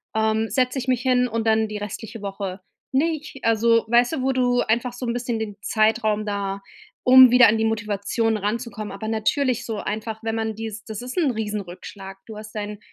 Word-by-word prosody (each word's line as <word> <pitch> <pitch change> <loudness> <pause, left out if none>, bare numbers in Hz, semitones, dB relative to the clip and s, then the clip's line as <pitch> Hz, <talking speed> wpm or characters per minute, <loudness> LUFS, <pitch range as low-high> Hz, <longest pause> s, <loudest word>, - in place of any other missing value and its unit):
ähm, 220 0 +1
setze 255 +4 +1
ich 255 - -6
mich 255 -2 +1
hin 250 -1 +3
und 230 -1 -2
dann 220 0 +3
die 210 - -5
restliche 210 +1 -7
Woche 195 -1 -5 0.3
nicht.“ 300 -1 -1
Also, 230 0 +3
weißt 240 +4 +3
du, 260 -5 -2
wo 265 - +2
du 245 -1 +2
einfach 240 +2 0
so 250 0 -6
'n 235 - -1
bisschen 240 -1 -2
den 210 -2 -5
Zeitraum 215 -1 +1
da 200 -1 -3 0.4
um 255 0 +9
wieder 250 0 +8
an 220 +1 +3
die 220 - 0
Motivation 220 +1 0
ranzukommen. 215 0 -3
Aber 200 +2 -6
natürlich 230 +3 0
so 225 -2 -4
einfach, 220 +1 -4
wenn 225 0 -2
man 220 -1 -2
die 225 -1 -5
das 215 0 -6
ist 255 +7 -7
'n 310 - +3
riesen 210 -2 -3
Rückschlag. 190 +1 -10
Du 220 - -9
hast 215 0 -10
deinen, 210 0 -5
220 Hz, 205 wpm, -23 LUFS, 210-245 Hz, 0.4 s, um